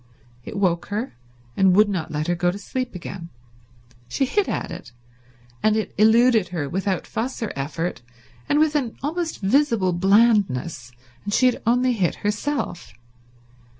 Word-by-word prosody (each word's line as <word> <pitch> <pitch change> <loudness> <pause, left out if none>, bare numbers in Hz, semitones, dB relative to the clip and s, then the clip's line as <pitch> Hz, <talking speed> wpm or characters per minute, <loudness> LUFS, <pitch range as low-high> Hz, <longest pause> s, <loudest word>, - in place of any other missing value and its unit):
It 200 - -7
woke 175 -4 +1
her, 215 +5 -3 0.4
and 190 -2 +4
would 210 +1 +6
not 185 -6 -3
let 150 0 -2
her 175 - +1
go 175 +1 +1
to 180 - -3
sleep 250 +3 -4
again. 170 -1 -7 0.8
She 270 - 0
hit 410 +9 0
at - - -3
it, 130 - -9 0.7
and 215 0 +3
it 220 - -3
eluded 220 -1 +4
her 160 -5 -3
without 190 +4 -2
fuss 240 +2 -4
or 225 - -3
effort 155 +3 -3 0.5
and 290 - +3
with 310 0 +3
an 255 -6 -1
almost 325 0 -3
visible 215 -4 +2
blandness, 185 - +2 0.3
and 205 - -4
she 255 - +3
had 250 - +2
only 250 +2 +3
hit 190 -7 0
herself. 210 -2 -2
205 Hz, 155 wpm, -23 LUFS, 175-245 Hz, 0.8 s, would